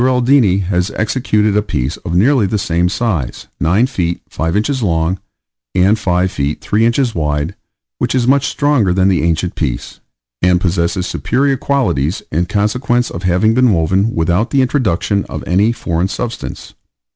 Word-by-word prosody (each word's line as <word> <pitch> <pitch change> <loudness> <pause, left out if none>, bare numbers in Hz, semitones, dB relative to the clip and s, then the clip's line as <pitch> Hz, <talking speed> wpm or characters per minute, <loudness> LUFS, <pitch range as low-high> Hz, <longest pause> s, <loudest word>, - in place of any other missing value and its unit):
Aldini 125 -6 +3
has 90 0 0
executed 105 -2 0
a 105 - +3
piece 65 -10 -3
of 85 - -5
nearly 115 +3 +3
the 105 - -1
same 90 -2 0
size, 95 - -2
9 90 - +3
feet 85 -10 -2
5 80 +4 -1
inches 130 +5 -1
long, 85 -2 0 0.6
and 100 +4 +3
5 90 -2 0
feet 70 +2 -2
3 110 +2 +1
inches 120 0 +1
wide, 75 +1 -1 0.5
which - - 0
is 125 -2 +2
much 135 +2 +3
stronger 140 -11 +1
than 95 0 +3
the 90 -5 +2
ancient 85 +2 0
piece, 65 -7 -4 0.4
and 90 0 +3
possesses 90 +1 0
superior 135 +8 0
qualities, 110 - -1
in 85 +3 0
consequence 120 +5 0
of 85 - -6
having 90 +5 +2
been 125 -2 +3
woven 95 +6 +1
without 85 +7 +1
the 135 -2 +2
introduction 105 - 0
of - - -7
any 100 +6 +2
foreign 85 -6 -1
substance. 115 +4 -6
95 Hz, 160 wpm, -16 LUFS, 85-120 Hz, 0.6 s, Aldini